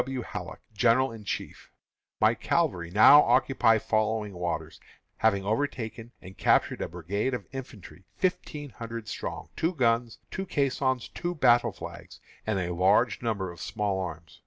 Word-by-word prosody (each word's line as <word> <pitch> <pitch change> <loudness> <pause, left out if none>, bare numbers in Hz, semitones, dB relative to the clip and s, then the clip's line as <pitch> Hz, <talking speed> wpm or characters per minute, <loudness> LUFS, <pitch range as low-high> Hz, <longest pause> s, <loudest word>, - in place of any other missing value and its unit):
W. 130 -2 -4
Halleck, - - -7
General 120 +4 +3
in 110 -2 -10
Chief_: - - -5 0.5
My 110 +1 +5
cavalry 115 - 0
now 110 +10 +8
occupy 115 -7 +3
Falling 110 -1 0
Waters, 90 -1 -4 0.4
having 100 -3 +2
overtaken 115 -1 -2
and 95 +1 -12
captured - - +2
a - - -3
brigade 100 +9 -2
of 110 - -7
infantry, 120 -8 -9
fifteen 150 -6 -2
hundred 115 -1 -7
strong, - - -5
two 170 +3 0
guns, 115 -3 +1
two 190 0 -4
caissons, 130 -3 0
two 175 +1 -4
battle 120 -5 +4
flags, - - -10 0.3
and 110 -2 +1
a 90 -2 -2
large 95 +6 +3
number 105 -6 -2
of 85 -1 -12
small 105 -3 -2
arms. 80 -3 -7
115 Hz, 150 wpm, -28 LUFS, 100-130 Hz, 0.5 s, now